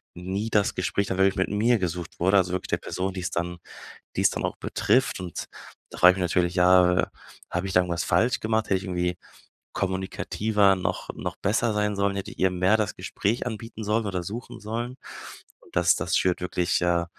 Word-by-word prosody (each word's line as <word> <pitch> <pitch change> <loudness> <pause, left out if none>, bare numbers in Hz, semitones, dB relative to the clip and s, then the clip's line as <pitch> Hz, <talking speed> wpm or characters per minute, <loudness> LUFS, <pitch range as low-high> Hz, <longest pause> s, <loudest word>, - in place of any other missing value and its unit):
nie 95 +5 -3
das 105 -2 +2
Gespräch 100 0 -1
dann 95 - -2
wirklich 95 0 +3
mit 95 - 0
mir 110 +3 +2
gesucht 90 -2 -4
wurde, 95 +3 +4
also 90 -1 +2
wirklich 95 - -3
der - - +1
Person, 95 +1 -3
die's 90 -1 -4
dann 85 +1 -3 0.6
die's - - +4
dann - - -4
auch - - -5
betrifft 125 -6 +1
und 90 -3 -5 0.5
da - - -10
frage 90 +1 +8
ich - - -7
mich - - -1
natürlich, 90 -1 +2
ja, 90 0 +5 0.4
habe 90 +2 -2
ich 95 - -4
da 90 - +6
irgendwas 85 -2 -1
falsch 110 +8 +2
gemacht, 110 0 0
hätte 95 - +2
ich 95 - -10
irgendwie 90 -1 -1 0.6
kommunikativer 95 +2 +1
noch 90 0 -3
noch - - -5
besser 110 +3 +1
sein 105 0 0
sollen, 100 0 0
hätte 100 - -5
ich - - -15
ihr 95 - +4
mehr 90 +4 +3
das 110 -2 -2
Gespräch 115 +5 -2
anbieten 110 -1 -6
sollen 110 +2 +1
oder 95 -3 -2
suchen 115 +6 -7
sollen? 120 +4 -4 0.8
Das - - +4
das - - 0
schürt 90 -1 +1
wirklich, 90 0 0
äh 85 -1 +2
95 Hz, 200 wpm, -26 LUFS, 90-105 Hz, 0.8 s, frage